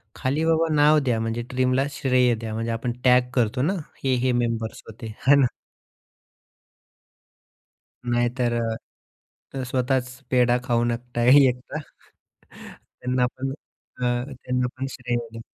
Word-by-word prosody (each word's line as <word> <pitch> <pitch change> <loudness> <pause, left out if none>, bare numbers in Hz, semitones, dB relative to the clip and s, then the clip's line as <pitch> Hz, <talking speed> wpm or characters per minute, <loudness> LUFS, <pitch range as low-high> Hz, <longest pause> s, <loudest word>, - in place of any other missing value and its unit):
खाली 145 +5 -1
बाबा 165 0 +2
नाव 150 +1 +5
द्या. 125 -5 0
म्हणजे 115 +1 -2
टीमला 130 +1 +2
श्रेय 130 -3 +2
द्या, 110 -1 -6
म्हणजे 115 +1 -2
आपण 115 +2 -2
टॅग 125 -1 +4
करतो 125 0 +1
ना, 160 +8 +1 0.3
हे, 130 -1 +2
हे 125 +1 +1
मेंबर्स 115 -2 -1
होते 115 +1 -10 0.2
आहे 140 - +8
ना. - - +5 2.7
नाही 120 0 +2
तर 120 -1 +1 1.0
अ, 135 - -3
स्वतःच 125 0 0 0.2
पेढा 125 -1 +3
खाऊ 120 -2 +1
नका 120 0 -2
एकटा. 130 +2 +4 1.2
त्यांना 125 0 +1
पण 135 +1 -3
अ, 135 -3 -16 0.3
त्यांना 125 -1 -2
पण 135 +1 -3
श्रेय 125 -2 -3 0.2
द्या. 115 - -8
125 Hz, 130 wpm, -24 LUFS, 120-130 Hz, 2.7 s, आहे